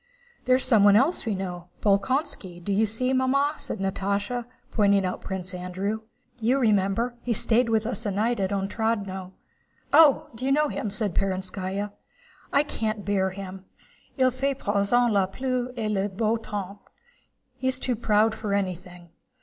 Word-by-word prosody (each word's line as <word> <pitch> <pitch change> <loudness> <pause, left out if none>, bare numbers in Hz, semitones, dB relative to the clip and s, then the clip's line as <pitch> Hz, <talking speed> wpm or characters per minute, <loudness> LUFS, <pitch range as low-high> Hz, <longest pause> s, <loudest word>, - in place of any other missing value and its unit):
"There's 255 +1 +4
someone 205 -5 +6
else 270 +3 +2
we 215 - 0
know—Bolkónski, 190 - -2
do 200 - -1
you 215 +3 +3
see, 255 +5 0
Mamma?" 275 +3 +2
said - - -5
Natásha, 200 +4 -2 0.3
pointing 200 -3 +3
out 185 - -3
Prince 185 -1 -5
Andrew. 185 +4 -3 0.4
"You 235 +4 +2
remember, 225 +1 +1
he 240 - -1
stayed 235 +3 +3
a - - -3
night - - -1
with 220 -1 +2
us 230 -1 -3
at 200 - -2
Otrádnoe." 200 -2 -1 0.6
"Oh, 300 -2 +6
you 260 +2 0
know 300 +1 +3
him?" 215 - -3
said 210 -2 -2
Perónskaya. 190 +1 -2 0.6
"I 280 - +4
can't 215 -7 -3
bear 190 -1 +1
him. 190 0 -8 0.5
Il 255 -1 +4
fait 270 +2 -1
à - - -24
présent 225 +5 +3
la 195 -2 +3
pluie 255 +4 -2
et 215 -2 -1
le 200 0 0
beau 215 +3 0
temps. 205 -3 -5 0.4
* 255 - -44
He's 260 0 +1
too 255 -1 -1
proud 215 0 +2
for 215 -2 -2
anything. 180 -2 -4
210 Hz, 160 wpm, -26 LUFS, 195-245 Hz, 0.6 s, someone